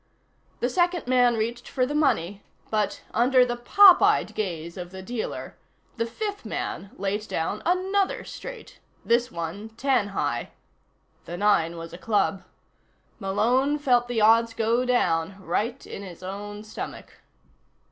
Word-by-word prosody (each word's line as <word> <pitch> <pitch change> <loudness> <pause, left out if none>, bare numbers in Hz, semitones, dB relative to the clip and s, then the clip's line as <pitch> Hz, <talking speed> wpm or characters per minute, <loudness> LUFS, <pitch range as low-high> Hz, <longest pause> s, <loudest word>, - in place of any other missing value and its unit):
The 245 - +1
second 350 +2 +1
man 245 -2 +3
reached 235 +2 -3
for 255 - +1
the 285 - -4
money 215 - +1 0.3
but, 210 -2 -1
under 250 +2 +4
the 240 -1 -2
popeyed 365 +10 +6
gaze 170 -5 -4
of 180 -1 -7
the 190 +1 -9
dealer, 235 +2 -5 0.4
the 230 0 0
fifth 410 - -4
man 195 - -4
laid 205 +2 -2
down 180 +4 -2
another 380 +2 +1
straight - - -9 0.3
this 240 +1 +2
one 170 +6 -5
ten 245 -1 +1
high. 200 - -2 0.7
The 175 - -6
nine 170 -5 +2
was 165 0 -8
a 175 - -9
club 205 -2 +1 0.8
Malone 240 +9 +1
felt 245 -4 +2
the 240 -2 -1
odds 230 +1 +5
go 230 +2 +1
down, 190 -7 +1
right 215 +8 -2
in - - -7
his 185 -2 -10
own 205 +2 -6
stomach. 215 - -8
225 Hz, 140 wpm, -25 LUFS, 195-255 Hz, 0.8 s, popeyed